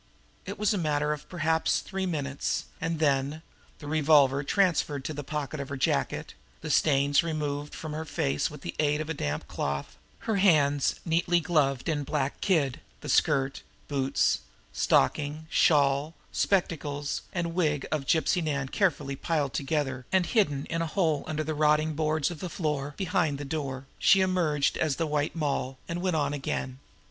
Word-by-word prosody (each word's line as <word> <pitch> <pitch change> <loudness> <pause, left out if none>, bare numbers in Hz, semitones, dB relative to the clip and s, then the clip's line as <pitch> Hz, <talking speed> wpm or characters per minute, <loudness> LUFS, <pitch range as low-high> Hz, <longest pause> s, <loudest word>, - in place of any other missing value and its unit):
It 200 - -5
was 210 +1 +2
a 200 - -1
matter 150 -2 +1
of 150 - -9
perhaps 160 -2 +1
three 190 -1 -3
minutes; 140 -5 -2 0.2
and 165 0 -1
then, 145 +1 +1 0.3
the 150 - -11
revolver 145 -2 +4
transferred 155 -5 +1
to 155 - -3
the 145 0 -5
pocket 150 +1 -4
of 140 - -5
her 140 - -4
jacket, 130 - -1 0.3
the - - -3
stains 145 -1 +4
removed 150 -3 -3
from 155 -2 -6
her 155 +1 -3
face 75 - -1
by - - -9
the 85 - -6
aid 150 -1 +2
of 155 - -2
the 160 - -3
damp 75 - -3
cloth, 70 0 -3 0.2
her 220 -2 -1
hands 145 -7 +3
neatly 175 +1 +2
gloved 145 -6 +1
in 150 -3 0
black 140 -1 -2
kid, 155 -10 +1 0.2
the - - -7
skirt, 135 0 +2 0.3
boots, 130 - +1 0.3
stockings, 145 - +1
shawl, 145 +1 +3 0.2
spectacles 150 -6 0
and 170 -2 -2
wig 150 -5 +1
of 150 -3 -1
Gypsy 165 +3 +2
Nan 140 -3 -1
carefully 145 -8 0
piled 145 -2 -1
together 135 -3 -2
and 190 -2 +3
hidden 150 - +1
in 165 0 -2
a 165 - -1
hole 160 -4 +1
under 155 0 -2
the 155 +1 -2
rotting 155 +1 +2
boards 155 +1 0
of 165 - -7
the 180 - -4
floor, 150 -4 -2
behind 160 -6 0
the 145 - -6
door, 135 -3 -4
she 195 - +5
emerged 170 -6 +1
as 155 -3 +1
the 165 - -1
White 150 0 -1
Moll, 140 -4 -1
and 170 +1 -3
went 185 -2 0
on 145 -2 0
again. 135 -2 -3
150 Hz, 175 wpm, -28 LUFS, 140-165 Hz, 0.3 s, she